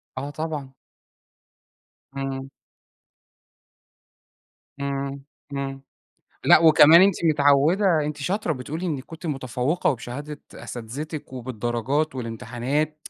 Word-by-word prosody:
آه 135 +2 -4
طبعًا. 150 -3 -5 1.4
إمم. 135 0 -4 2.3
إمم، 140 0 -3 0.3
إمم 135 -1 -4 0.6
لأ، - - +8
وكمان 160 +1 +8
أنتِ 195 -1 +5
مِتعودة 150 +4 +4 0.2
أنتِ 150 0 -4
شاطرة 180 +4 -1
بتقولي 155 +6 -5
إنِك 145 -6 -3
كُنتِ 165 +3 -9
متفوقة 135 +2 0
وبشهادة 145 +4 -6
أساتذتِك 140 +6 -7
وبالدرجات 125 +4 -2
والامتحانات 130 +6 -3
140 Hz, 85 wpm, -24 LUFS, 130-155 Hz, 2.3 s, لأ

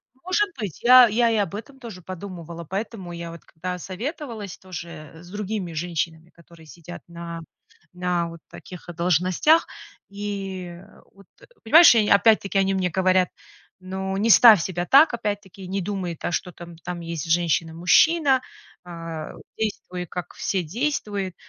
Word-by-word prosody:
Может 370 +9 0
быть. 200 -8 -5
Я 250 0 +8
я 235 +3 +2
я - - +1
и 220 - +1
об 200 -2 -1
этом 265 +6 -9
тоже 225 -8 -9
подумывала. 170 -2 -8
Поэтому 195 0 -5
я 170 -1 -7
вот 170 - -12
когда 180 +2 -6
советовалась 220 - -6
тоже 170 -5 -9
с 175 +2 -14
другими 205 -3 -4
женщинами, 165 0 -4
которые 170 -1 -18
сидят 170 +2 -11
на 170 -1 -8 0.5
на 180 -1 -1
вот 165 0 -11
таких 180 -1 -12
должностях. 180 - +3 0.4
И 195 -3 -6 0.3
вот, 195 -1 -19 0.4
понимаешь, 320 +6 +8
они 220 - +4
мне - - +4
опять-таки 195 -3 +2
говорят: 185 0 +2 0.5
"Ну, 190 +1 -4
не 220 +3 +1
ставь 220 -5 +8
себя 175 0 -3
так, 285 - +6
опять-таки 205 -4 -5
не 195 +1 -2
думай, 180 -4 -4
да, - - -2
что 180 +1 -2
там 170 0 -12
там 175 +1 -6
есть 165 -2 -5
женщина-мужчина, 175 - +3 0.4
а, 165 -3 -7 0.3
действуй, 185 -4 -4
как 180 0 -7
все 190 -2 -1
действуют". 205 - -3
185 Hz, 145 wpm, -23 LUFS, 170-210 Hz, 0.5 s, Я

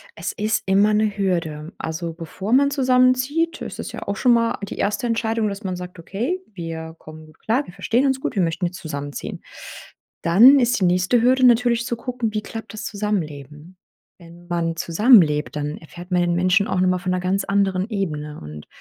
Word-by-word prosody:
Es 165 - -4
ist 215 +1 -1
immer 200 +2 +3
'ne 210 -1 +1
Hürde. 165 -4 -2
Also, 165 +1 -4
bevor 180 +5 -6
man 280 +2 +5
zusammenzieht, 260 +4 +2
ist - - -7
es - - -5
ja - - -6
auch 200 -1 -2
schon 245 +3 +4
mal 230 0 +1
die - - -7
1. 210 +5 -1
Entscheidung, 225 -1 0
dass 200 +1 -5
man 185 -2 -3
sagt: 180 0 -9
„Okay, 230 - -3
wir 165 -2 -6
kommen 155 0 -12
gut 155 -1 -20
klar. 250 +6 0
Wir 175 - -13
verstehen 245 +4 0
uns 265 -1 +1
gut. 265 - -4
Wir 195 - +2
möchten 165 +2 -1
jetzt 180 +2 -4
zusammenziehen.“ 145 -2 -6 0.8
Dann 235 +12 +7
ist 245 0 +2
die - - +4
nächste 180 +6 +2
Hürde 255 +1 +4
natürlich 240 -1 +3
zu 240 - -2
gucken: 240 -2 -3
Wie 215 - -1
klappt 225 -1 -8
das 215 - -7
Zusammenleben? 165 -5 -4 0.4
Wenn 170 0 -15
man 170 -1 -1
zusammenlebt, 165 - +4
dann 150 0 -3
erfährt 175 +3 -12
man 180 - +2
den 175 0 +1
Menschen 185 +3 +2
auch 180 - -1
nochmal 185 0 +2
von 185 0 -3
'ner 180 0 -1
ganz 190 +2 0
anderen 195 0 0
Ebene 150 -8 -4
und 75 0 -10
190 Hz, 200 wpm, -22 LUFS, 170-230 Hz, 0.8 s, Dann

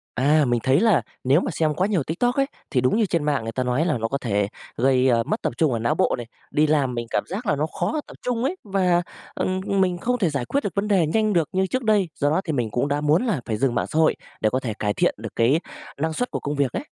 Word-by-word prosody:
À, 145 +4 +3
mình 120 -2 +1
thấy 135 +5 +3
là 220 -7 +4 0.2
nếu 135 +5 +4
mà - - -2
xem 155 0 0
quá 185 +5 +1
nhiều 195 -7 +1
TikTok 245 - 0
ấy, 275 - +2 0.2
thì 125 - +2
đúng 125 +9 +2
như 220 -2 +3
trên 170 -5 -1
mạng 145 -5 +1
người 115 0 -4
ta 130 +2 -1
nói 125 +5 +1
là 155 -8 0
nó 115 0 -1
có 140 - -2
thể 100 -5 0 0.3
gây, 130 +1 +3
a, 115 -2 +3
mất - - -3
tập - - -1
trung 155 -6 +3
ở 115 - 0
não 115 +1 +1
bộ - - +2
này, 120 - -6 0.2
đi 150 +1 +3
làm 145 -5 +1
mình 120 0 -3
cảm - - 0
giác 210 +6 -5
là 150 - +2
nó 150 +2 0
khó 310 - 0
tập - - -12
trung 245 -1 -1
ấy 345 +7 0
và, 185 -4 +2 0.3
ừm, 185 0 -1
ừm, 195 -1 +1
mình 180 -2 +1
không 245 +6 -1
thể 180 -7 +1
giải 140 -4 -2
quyết 280 - -1
được 200 - -3
vấn 200 +1 -1
đề 190 -6 +3
nhanh 215 +6 +1
được 170 -5 +2
như 190 0 +1
trước 255 +6 -2
đây, 210 -5 +3
do 145 - 0
đó 170 +5 +2
thì 160 - -2
mình 120 -6 -1
cũng 120 +7 0
đã 145 +1 0
muốn 150 +8 +2
là 180 - 0
phải 110 - -1
dừng 125 +2 +1
mạng 120 - 0
xã 155 - -2
hội 160 -1 +4 0.2
để 110 - +2
có 130 - 0
thể 120 -4 -3
cải 105 -1 0
thiện - - +2
được 115 0 -6
cái 125 +8 +3 0.4
năng 160 +2 -1
suất 245 +10 -2
của - - -3
công 145 +1 -3
việc 140 -3 +1
ấy. - - -3
150 Hz, 300 wpm, -23 LUFS, 125-190 Hz, 0.4 s, là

